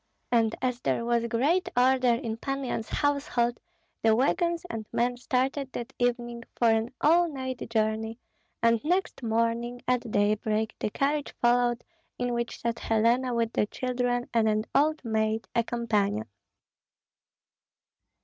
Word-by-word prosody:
And 225 -2 +3
as 250 -1 0
there 235 - 0
was 235 0 +1
great 285 +11 +1
order 255 -1 +4
in 230 -3 -3
Pan 275 +3 -3
Yan's 230 -3 -3
household 275 -5 0 0.4
the 220 -1 +4
wagons 340 +7 +1
and 220 -8 -5
men 245 +1 +1
started 265 +2 -1
that 235 - -6
evening 240 -1 -1
for 235 -2 +4
an 225 +2 +1
all 340 +3 +4
night 260 -3 -4
journey, 220 0 0 0.5
and 230 -1 +3
next 360 +2 0
morning 230 +1 0
at 250 -1 0
daybreak 215 +1 +1
the - - -1
carriage 285 +5 -1
followed 240 0 +2 0.3
in 245 -1 -1
which 235 0 -3
sat 235 0 -2
Helena 235 +3 +2
with 230 -1 0
the 210 - +1
children 245 0 -1
and 225 -2 +3
an 215 0 0
old 305 0 +2
maid, 220 0 0
a 235 - +2
companion. 210 - 0
240 Hz, 140 wpm, -28 LUFS, 225-255 Hz, 0.5 s, order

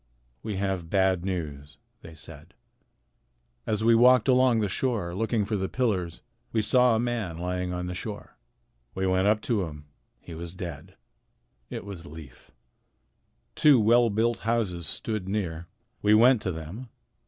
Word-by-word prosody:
"We 110 -2 -4
have 95 -3 -2
bad 95 -2 +2
news," 75 -6 -5 0.2
they 80 -1 -12
said. 75 - -11 1.1
"As 110 0 0
we 115 +1 +5
walked 125 0 +5
along 130 -2 +4
the 105 - +1
shore 100 -4 -1
looking 110 +2 0
for 105 +1 -2
the 95 0 -2
pillars 95 -10 -1 0.3
we 110 -1 +1
saw 125 +2 +4
a - - +1
man 115 -8 -2
lying 90 +1 -3
on 90 0 -3
the 90 - -4
shore. 105 +3 -7 0.6
We 95 - -1
went 95 +1 +2
up 105 +1 +3
to 110 -4 0
him. 75 -2 -10 0.3
He 85 - -11
was 85 +2 -7
dead. 85 -5 -8 0.7
It - - -6
was 90 -4 -8
Leif. 75 -5 -12 1.0
Two 145 -5 +5
well 115 +2 +4
built 115 +3 0
houses 105 -8 -1
stood 105 +2 -3
near. 85 -5 -3 0.3
We 105 +1 +5
went 120 +1 +5
to 95 - -2
them. 85 +10 -8
100 Hz, 155 wpm, -27 LUFS, 85-115 Hz, 1.1 s, we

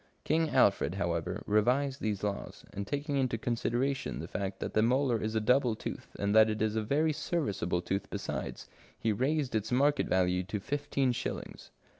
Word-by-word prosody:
King 160 +1 +2
Alfred, 95 -6 +3
however, 85 -4 -2
revised 130 +6 +2
these 105 -2 -2
laws, 100 -1 -4
and 100 0 -4
taking 145 0 -2
into 130 -4 +1
con 120 +2 -1
sideration 130 +4 -1
the - - -5
fact 95 -1 -4
that - - -4
the 110 - +4
molar 125 0 +2
is 110 +1 -2
a - - +3
double 125 +1 +3
tooth, - - -7
and 100 0 0
that 110 0 +7
it 110 0 -2
is 110 0 0
a 110 - +1
very 150 +8 +1
serviceable 105 - -1
tooth 95 +3 -2
besides, - - -4 0.3
he 115 - 0
raised 135 +5 0
its 110 0 -1
market 140 +3 +3
value 90 0 +2
to 100 +3 -4
fifteen 140 +2 0
shillings. 120 - -5
110 Hz, 185 wpm, -31 LUFS, 100-140 Hz, 0.3 s, that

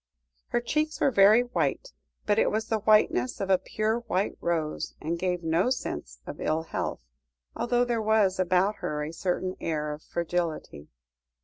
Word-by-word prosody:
Her 240 - 0
cheeks 305 +5 -1
were 275 - +3
very 210 +1 +6
white, 250 - -2 0.3
but 210 +1 +2
it - - +3
was 220 +1 -1
the 220 - +1
whiteness 210 - +3
of 195 -1 -1
a 185 - +5
pure 215 +4 -1
white 205 -5 -1
rose, 160 -3 -2
and 165 +2 -3
gave 180 -1 -1
one 165 -1 -3
no 175 +9 +3
sense 260 - -4
of - - -8
ill 160 +1 0
health, 160 - -4 0.5
although 245 0 +1
there 235 -2 -1
was 210 -3 +2
about 185 +3 +2
her 150 0 -3
a 155 +2 -5
certain 185 +2 -2
air 150 -2 -2
of 150 - -9
fragility. 170 - -3
190 Hz, 175 wpm, -27 LUFS, 165-220 Hz, 0.5 s, very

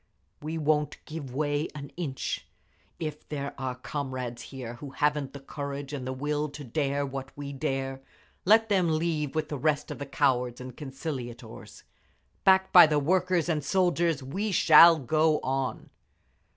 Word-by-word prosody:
We 155 +2 -4
won't 150 -1 +1
give 155 -4 -7
way 145 +3 -1
an 140 -2 -8
inch. 145 -7 -4 0.5
If 155 -3 -6
there 140 -2 -4
are 130 -1 -3
comrades 130 -3 -5
here 125 -2 -7
who 140 +3 -8
haven't 150 -2 0
the 140 - -7
courage 140 0 -6
and 130 -3 -4
the - - -2
will 150 +3 -2
to 145 +1 -9
dare 140 +2 -1
what 135 -1 -6
we 140 -1 -6
dare, 135 0 -3 0.4
let 220 +3 +5
them 180 -6 +2
leave 155 -3 -1
with 155 -1 -1
the 145 - -4
rest 150 +1 0
of - - -6
the 140 - -5
cowards 125 -3 +1
and 125 -1 -8
conciliators! 135 -4 -7 0.6
Backed 190 0 +4
by 175 -3 +10
the 150 -1 +1
workers 180 +3 +2
and 155 -4 0
soldiers 170 -3 +1
we 195 +11 -2
shall 165 -1 +8
go 155 +3 +2
on." 135 0 -3
145 Hz, 160 wpm, -28 LUFS, 135-160 Hz, 0.6 s, by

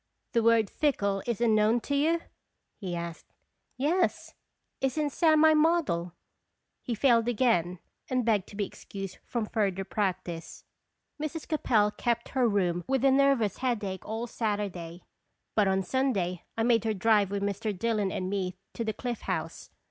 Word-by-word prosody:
"The 235 - +2
word 225 -1 +4
'fickle' 200 -10 0
is 235 -1 -1
unknown 220 0 +4
to 285 - -2
you?" 325 +4 +2 0.6
he 185 -4 -4
asked. 170 -1 -7 0.4
"Yes. 335 +7 0 0.5
Isn't 285 +3 0
Sam 315 0 +4
my 315 0 +7
model?" 300 - +2 0.7
He 240 - -3
failed 235 -1 +3
again, 210 -7 +2 0.3
and 255 -2 0
begged 210 -4 +2
to - - -12
be 205 0 -1
excused 195 -1 -8
from 235 -3 -2
further 195 -3 -1
practice. 185 -4 -3 0.6
Mrs. 310 +1 -4
Capel 220 -9 +2
kept 235 +1 -1
her 255 -3 +2
room 175 -4 0
with 265 0 +1
a 270 - +6
nervous 270 -7 +3
headache 210 -7 -2
all 225 +2 -4
Saturday, 200 -7 -3 0.5
but 210 -2 +3
on 190 0 +1
Sunday 195 -9 -1
I 225 - +1
made 230 -2 +3
her 220 -1 0
drive 205 -1 +3
with 200 0 -2
Mr. 200 +2 -1
Dillon 215 -2 0
and 185 - -3
me 185 -2 -2 0.2
to 230 - -3
the 220 -1 -2
Cliff 245 0 -4
House. - - -4
220 Hz, 155 wpm, -29 LUFS, 195-255 Hz, 0.7 s, my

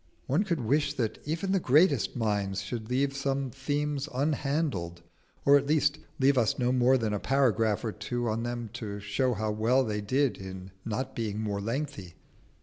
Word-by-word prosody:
One 145 +8 +2
could 170 -8 -1
wish 145 +5 +1
that 115 -5 -2
even 165 +6 -2
the 195 - +3
greatest 145 - +3
minds 100 -4 -1
should 115 -2 -5
leave 135 +2 +1
some 135 -1 -1
themes 145 +1 -2
unhandled, 135 - -1 0.4
or 140 0 +8
at 140 - -6
least 150 0 +2 0.2
leave 135 0 +4
us 110 -4 +1
no 125 -1 +1
more 130 +1 +4
than 110 -3 -1
a 105 - -1
paragraph 115 -5 +2
or 110 - -1
two 120 +4 -3
on 110 +1 -1
them 120 -2 -4
to 105 -4 -5
show 105 +5 0
how 110 0 -1
well 115 +5 +2
they 105 -3 -2
did 130 +2 +1
in 95 0 -8
not 125 +4 -3
being 110 -3 -2
more 105 -2 -2
lengthy. 115 - -4
125 Hz, 180 wpm, -29 LUFS, 105-140 Hz, 0.4 s, or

